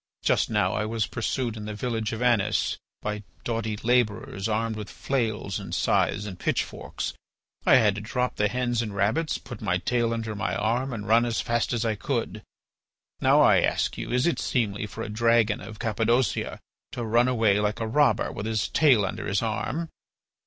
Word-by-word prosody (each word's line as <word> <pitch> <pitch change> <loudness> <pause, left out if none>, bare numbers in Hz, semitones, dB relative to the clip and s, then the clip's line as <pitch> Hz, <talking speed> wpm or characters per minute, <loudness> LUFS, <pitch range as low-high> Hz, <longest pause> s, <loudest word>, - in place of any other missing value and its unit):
Just - - +2
now - - +1
I 105 - 0
was 110 0 -1
pursued 120 0 -2
in 105 -1 -7
the 105 -1 -5
village 115 0 -2
of 115 +1 -3
Anis 110 -4 +2 0.2
by 105 0 -3 0.2
doughty 110 -2 -2
labourers 115 -4 +1
armed 110 +1 0
with 105 -2 -6
flails 110 -7 -2
and - - -5
scythes 105 - +1
and 95 -4 -7
pitchforks. - - -2 0.5
I - - +8
had 110 -5 +5
to 100 - -5
drop 125 +3 -2
the 105 - +3
hens 120 +1 0
and 105 -3 -5
rabbits, 110 +12 +1
put - - -10
my 95 -4 +1
tail 120 +4 0
under 115 -1 -3
my 105 +2 -2
arm, 120 +5 0
and 110 -3 -5
run 115 +2 +5
as 120 -2 -1
fast 120 0 0
as 115 -1 0
I 110 - +1
could. 110 -1 -3 0.8
Now - - +5
I - - +6
ask - - 0
you, - - -5
is 125 +2 +2
it 170 - +1
seemly 105 -4 -1
for 115 +3 -6
a - - -5
dragon 115 0 +2
of 110 -2 -9
Cappadocia 115 +2 0 0.3
to 120 - -3
run 120 +3 +3
away 110 -5 +3
like 105 +2 -1
a 115 - -1
robber 145 +6 +2
with 110 - -5
his 110 -2 0
tail 130 -10 +4
under 95 - -4
his 100 +2 0
arm? 110 +10 -2
110 Hz, 190 wpm, -26 LUFS, 105-120 Hz, 0.8 s, I